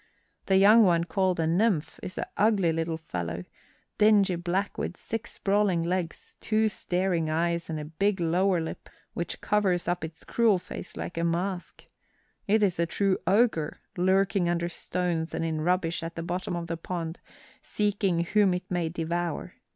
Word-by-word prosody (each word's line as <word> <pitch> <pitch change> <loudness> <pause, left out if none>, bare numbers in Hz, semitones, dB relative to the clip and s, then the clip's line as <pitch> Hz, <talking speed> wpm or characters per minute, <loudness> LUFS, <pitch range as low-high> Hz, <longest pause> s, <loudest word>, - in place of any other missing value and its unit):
The 190 - +4
young 210 +4 +7
one, 170 -4 +4
called 185 0 0
a 165 - +2
nymph, 175 -1 +1
is 185 - -7
an - - -1
ugly 200 -5 +3
little 165 0 -1
fellow, 90 - -5 0.6
dingy 210 -3 +5
black 180 +3 -1
with 180 - -3
six 225 +1 -5
sprawling 195 -4 +1
legs, 175 -1 -3
two 220 0 +2
staring 180 -4 -1
eyes, 170 +2 0
and 155 -1 -3
a 150 - -5
big 195 +6 0
lower 175 +2 +2
lip 160 - -6 0.2
which 170 - -4
covers 195 -5 +1
up 175 -1 -1
its 160 0 -7
cruel 225 -4 +3
face 180 - -8
like 165 - -4
a - - 0
mask. 175 +2 -2 0.6
It 210 +1 +3
is 185 -4 +1
a 170 - +2
true 195 +1 +1
ogre, 195 -7 +2 0.2
lurking 190 0 +2
under 170 0 0
stones 170 -2 -2
and 165 - -1
in 160 -1 -2
rubbish 175 0 0
at 165 0 -6
the 165 - -4
bottom 175 +1 -3
of 170 -1 -3
the 165 0 -4
pond 165 -1 -5 0.4
seeking 200 -4 0
whom 195 +1 +3
it 180 - -5
may 175 -2 0
devour. 170 0 -3
175 Hz, 170 wpm, -27 LUFS, 165-195 Hz, 0.6 s, young